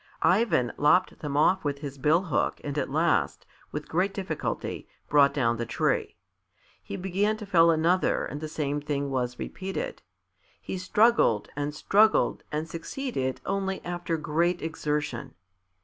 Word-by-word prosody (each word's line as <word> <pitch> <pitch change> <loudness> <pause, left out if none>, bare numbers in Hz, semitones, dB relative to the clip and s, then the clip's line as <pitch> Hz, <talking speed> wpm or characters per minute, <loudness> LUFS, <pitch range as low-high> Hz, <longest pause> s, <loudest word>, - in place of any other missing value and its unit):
Ivan 185 - +3
lopped 180 +6 +3
them 145 -2 -3
off 185 +5 +3
with 145 -1 -1
his 140 -1 -7
bill 155 +7 +3
hook 165 -8 0
and 145 -1 -4
at 140 -3 -1
last, 160 +4 +1 0.3
with 150 0 -5
great 185 +4 0
difficulty, 185 -6 -4 0.2
brought 145 -1 +5
down 120 -5 +1
the 120 - -2
tree. - - 0 0.7
He - - -6
began 195 +4 0
to 215 - -7
fell 170 -4 +5
another 165 +3 +2
and 145 - -6
the 155 - -3
same 145 -1 -2
thing 140 -1 -2
was 125 -2 -1
repeated. 195 - -5 0.6
He 185 - -5
struggled 195 - +3
and 145 +1 -3
struggled 215 +7 +3
and 155 +2 -2
succeeded 165 - -4
only 195 -1 -1
after 175 -1 -2
great 170 +3 0
exertion. 150 - -3
160 Hz, 150 wpm, -27 LUFS, 145-185 Hz, 0.7 s, brought